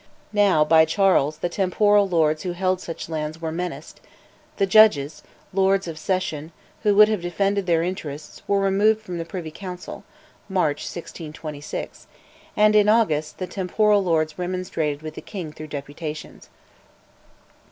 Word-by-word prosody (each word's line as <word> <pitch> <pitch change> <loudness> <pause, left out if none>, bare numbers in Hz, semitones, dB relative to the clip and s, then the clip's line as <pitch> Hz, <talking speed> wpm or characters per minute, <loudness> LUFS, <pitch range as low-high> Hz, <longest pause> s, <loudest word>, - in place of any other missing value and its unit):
Now, 200 -7 +4
by 160 +1 +6
Charles, 160 -4 +2
the 175 - -2
temporal 200 +3 +2
lords 155 -3 +2
who 180 -2 -3
held 185 +1 0
such 165 - -6
lands 155 0 -4
were 160 -1 -3
menaced, 175 +2 -6 0.6
the 195 - +3
judges 185 -8 +4 0.3
("Lords 195 0 +2
of 160 -2 -6
Session") 160 -3 -2 0.3
who 210 -2 +2
would 210 +1 +8
have 215 -4 -1
defended 195 +2 -1
their 165 -1 +2
interests 155 -5 -6
were 200 0 +2
removed 205 +3 +2
from 180 -4 -6
the 165 - -4
Privy 170 -2 -6
Council 180 +1 -8 0.5
(March 170 -7 +1
1626), 155 -3 -7 0.5
and, 215 0 +5
in 210 0 +5
August, 155 -9 +2
the 185 - -3
temporal 200 +2 +1
lords 160 -2 0
remonstrated 175 -5 -3
with 155 - -6
the - - -8
king 180 -7 -7
through 155 0 -9
deputations. 150 +2 -7
175 Hz, 145 wpm, -23 LUFS, 155-195 Hz, 0.6 s, would